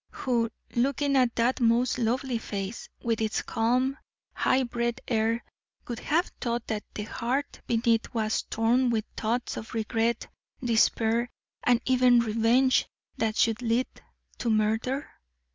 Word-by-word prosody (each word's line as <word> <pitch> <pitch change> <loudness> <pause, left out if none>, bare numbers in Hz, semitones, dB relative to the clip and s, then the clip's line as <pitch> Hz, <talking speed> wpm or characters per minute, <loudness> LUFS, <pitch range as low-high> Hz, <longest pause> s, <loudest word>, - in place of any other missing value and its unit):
Who, 235 -3 0 0.3
looking 275 +3 +1
at 250 -3 +3
that 240 +3 +1
most 240 +1 +2
lovely 245 +1 0
face, 200 0 -5
with 230 -2 0
its 220 -1 0
calm, 255 +5 +1 0.3
high 260 +1 +2
bred 235 -1 -2
air, 230 0 +1 0.4
would 240 -1 -4
have 340 +4 0
thought 235 -1 -1
that 215 -2 -3
the 210 - -3
heart 250 +6 -3
beneath 230 -1 +1
was 220 -2 0
torn 240 +3 +1
with 225 -2 0
thoughts 235 +3 -2
of 225 - -7
regret, 225 +1 0 0.4
despair, 230 0 +2 0.3
and 245 -1 +3
even 250 -1 +5
revenge 230 +4 +3 0.3
that 220 -1 0
should 225 +1 +2
lead 240 +2 +1 0.5
to 235 - -1
murder? 220 +6 +1
235 Hz, 135 wpm, -27 LUFS, 225-250 Hz, 0.5 s, even